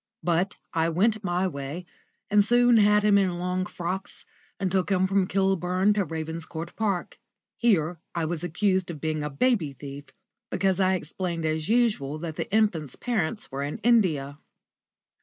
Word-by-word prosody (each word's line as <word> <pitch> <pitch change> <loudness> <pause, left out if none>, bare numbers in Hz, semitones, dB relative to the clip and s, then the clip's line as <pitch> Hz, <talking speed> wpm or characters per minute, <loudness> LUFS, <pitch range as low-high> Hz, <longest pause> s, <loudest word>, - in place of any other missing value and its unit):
But 175 +3 0 0.2
I 165 0 +2
went 215 +6 +1
my 180 0 0
way, 145 +1 -5 0.5
and 205 0 +6
soon 240 +2 +5
had 210 0 +5
him 205 -1 +5
in 185 -3 0
long 180 +1 -1
frocks, 185 +3 -5 0.3
and 190 -2 -1
took 190 0 +1
him 190 -1 +3
from 190 -1 +2
Kilburn 190 +1 +2
to 205 -2 0
Ravenscourt 160 +1 -6
Park. 200 -5 -2 0.4
Here 175 -8 +1 0.2
I 165 -1 0
was 165 0 -3
accused 185 +2 0
of 160 -3 -6
being 155 0 -2
a 150 - -2
baby 160 - +1
thief, 140 +1 -9 0.4
because 190 -1 +1
I 190 0 +3
explained 170 -1 -3
as 155 +1 -1
usual 215 - +1
that 160 0 -5
the - - -4
infant's 190 - +1
parents 220 - -2
were 135 +1 -4
in 145 +1 -3
India. 160 -12 +2
180 Hz, 160 wpm, -26 LUFS, 160-200 Hz, 0.5 s, and